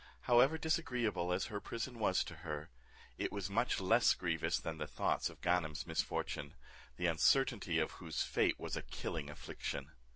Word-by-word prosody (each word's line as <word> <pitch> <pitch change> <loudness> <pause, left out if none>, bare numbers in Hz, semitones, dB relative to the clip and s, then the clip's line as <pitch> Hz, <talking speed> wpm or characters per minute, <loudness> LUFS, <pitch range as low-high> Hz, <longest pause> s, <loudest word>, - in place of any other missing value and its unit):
However, 125 +6 +5
disagreeable 125 - 0
as 90 +2 +1
her 105 -3 -4
prison 115 +1 -4
was 95 -4 +3
to 85 - -9
her, 75 -5 -5 0.5
it - - -1
was 100 -1 -3
much 115 +4 +2
less 110 +6 +5
grievous 80 -3 0
than 80 -1 -5
the 75 - -3
thoughts - - 0
of - - -14
Ganem's 85 -4 +1
misfortune, 70 - -2 0.4
the 90 - -1
uncertainty 95 - +3
of 80 - +1
whose 80 -4 -3
fate - - +1
was - - -3
a - - -2
killing 75 -3 -4
affliction. 70 -1 -5
90 Hz, 165 wpm, -36 LUFS, 80-115 Hz, 0.5 s, However